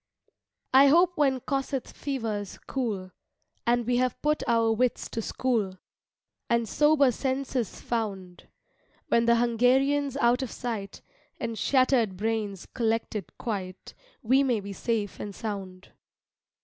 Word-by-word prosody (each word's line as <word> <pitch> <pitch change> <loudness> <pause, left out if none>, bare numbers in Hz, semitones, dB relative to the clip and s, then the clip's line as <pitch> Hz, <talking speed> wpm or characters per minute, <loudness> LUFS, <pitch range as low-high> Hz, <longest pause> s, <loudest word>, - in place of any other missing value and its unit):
I 270 +2 +8
hope 345 +5 +5
when 270 -4 +2
Kossuth 270 -1 -2
fever's 225 -8 -4
cool 210 -8 -3 0.6
And 240 0 +2
we 245 +1 +1
have 250 0 0
put 300 +1 +1
our 230 -1 +3
wits 240 +2 0
to 225 - -3
school, 220 -6 -1 0.7
And 235 -1 +2
sober 295 0 +4
senses 260 -2 -2
found; 195 -6 -4 0.6
When 235 0 +3
the 235 0 +5
Hungarian's 260 +4 +2
out 245 0 +3
of 260 - -3
sight 220 -5 -5 0.4
And 230 - -3
shattered 250 -6 +2
brains 210 -2 -2
collected 225 -3 -2
quite, 190 -5 -5 0.3
We 260 +4 +4
may 250 -5 +1
be 200 0 -7
safe 215 -1 -2
and 205 -2 -6
sound. 195 -4 -6
235 Hz, 125 wpm, -27 LUFS, 210-265 Hz, 0.7 s, I